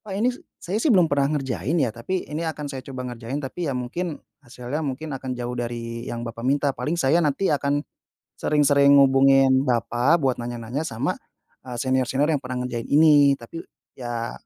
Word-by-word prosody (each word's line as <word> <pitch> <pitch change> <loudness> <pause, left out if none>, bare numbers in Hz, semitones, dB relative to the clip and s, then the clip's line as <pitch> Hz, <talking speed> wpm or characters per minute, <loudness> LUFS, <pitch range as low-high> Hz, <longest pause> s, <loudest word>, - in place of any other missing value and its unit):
"Pak, 200 -3 -7
ini 240 +5 +2 0.2
saya 195 +6 -3
sih 305 - +1
belum 180 - +4
pernah 140 -1 +2
ngerjain 130 - -2
ya, 130 -9 +1
tapi 120 +12 -3
ini 150 +2 -5
akan 155 -2 -4
saya 130 - -5
coba 130 -2 -5
ngerjain. 120 +3 -6
Tapi 150 +4 -4
ya 130 - -1
mungkin, 150 +7 -4 0.3
hasilnya 125 +4 -5
mungkin 150 +1 -4
akan 130 -1 -5
jauh 120 0 -4
dari 115 0 -5
yang 120 0 -4
bapak 115 0 -7
minta, 140 +1 +1
paling 150 +8 -3
saya 165 +2 +3
nanti 155 +4 +1
akan 145 0 0 0.6
sering-sering 140 -1 +4
hubungin 135 0 +5
bapak 120 +5 +2
buat 135 -7 -1
nanya-nanya 120 +2 -4
sama, 115 -8 -2 0.5
eee, 125 -1 -8
senior-senior 130 +2 +1
yang 145 - 0
pernah 125 -1 -4
ngerjain 120 -2 -4
ini. 145 -2 +5
Tapi 130 +8 -9 0.3
ya, 120 -2 -5
135 Hz, 180 wpm, -23 LUFS, 120-150 Hz, 0.6 s, hubungin